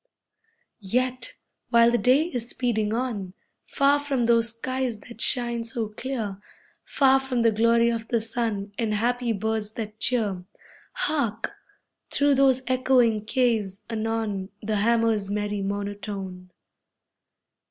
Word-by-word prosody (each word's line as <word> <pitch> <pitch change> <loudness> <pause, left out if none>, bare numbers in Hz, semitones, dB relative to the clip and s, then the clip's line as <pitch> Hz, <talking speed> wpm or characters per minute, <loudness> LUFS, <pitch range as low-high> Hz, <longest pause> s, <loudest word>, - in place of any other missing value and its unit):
Yet, 250 +4 -1 0.4
while 235 -1 +6
the 240 - +2
day 255 +8 +4
is 245 -8 -4
speeding 220 -4 0
on, 220 -6 -3 0.3
Far 280 +1 +3
from 280 -4 -1
those 230 0 +4
skies 255 -1 -2
that 235 0 -10
shine 240 -2 0
so 230 -1 -2
clear, 215 -4 -4 0.4
Far 270 -1 +4
from 260 -3 -1
the 230 - +5
glory 230 +2 +3
of 230 -1 -4
the 235 - +1
sun 220 -3 -2
And 220 -2 0
happy 240 +2 0
birds 220 0 -2
that 215 -1 -6
cheer 210 -7 0 0.5
Hark! 285 - -1 0.6
through 285 0 +3
those 265 -1 +3
echoing 250 -4 +2
caves, 225 -6 0
anon 220 -3 -2
The 215 0 0
hammer's 225 -1 +2
merry 205 0 -2
monotone. 200 -2 -5
230 Hz, 125 wpm, -25 LUFS, 210-250 Hz, 0.6 s, while